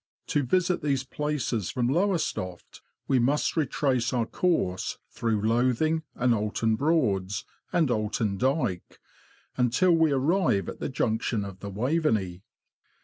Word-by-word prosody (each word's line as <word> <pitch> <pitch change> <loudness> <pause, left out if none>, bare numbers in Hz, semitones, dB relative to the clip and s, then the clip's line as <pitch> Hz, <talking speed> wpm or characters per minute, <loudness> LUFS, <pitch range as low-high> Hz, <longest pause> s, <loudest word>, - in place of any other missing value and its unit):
To 145 - +2
visit 180 +6 +1
these 140 -3 0
places 135 - -2
from 125 -3 0
Lowes 175 +5 +1
toft, 90 -1 -8 0.3
we 130 - +3
must 140 +5 +1
retrace 130 -5 0
our 120 -2 +1
course 110 - -1
through 115 -3 -1
Lothing 125 +8 +2
and 125 -1 +2
Oulton 110 +1 0
Broads, 105 - 0 0.3
and 165 -7 +2
Oulton 105 -2 -1
Dyke, 125 - -1 0.6
until 125 +9 +3
we 160 -2 +4
arrive 140 - +2
at - - -7
the - - -3
junction 110 -4 -1
of 95 -1 -9
the 100 - -6
Waveney. 110 - 0
125 Hz, 135 wpm, -27 LUFS, 105-150 Hz, 0.6 s, we